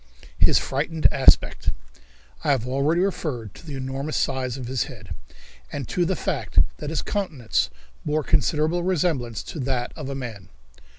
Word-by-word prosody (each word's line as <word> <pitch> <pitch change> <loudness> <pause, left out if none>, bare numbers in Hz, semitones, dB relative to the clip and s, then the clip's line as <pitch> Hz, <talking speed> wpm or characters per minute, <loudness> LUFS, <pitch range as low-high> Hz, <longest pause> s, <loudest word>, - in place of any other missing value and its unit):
His - - +6
Frightened 155 +4 -2
Aspect. 135 -2 +4 0.7
I - - +1
have 130 -4 +2
already 140 +6 +2
referred 140 - -2
to - - -13
the 150 -4 -6
enormous 135 +3 -3
size 130 -2 0
of 130 - -5
his 130 +1 0
head, 100 - -9 0.6
and 140 -3 -4
to 175 - +2
the 190 - +1
fact - - -3 0.2
that 150 - -5
his 160 - -1
countenance 155 - 0 0.3
bore 150 +1 0
considerable 155 +5 +2
resemblance 155 - 0
to 160 - -7
that 130 -2 -1
of 150 -4 -5
a 140 - -3
man. 110 -8 -6
140 Hz, 160 wpm, -25 LUFS, 125-155 Hz, 0.7 s, His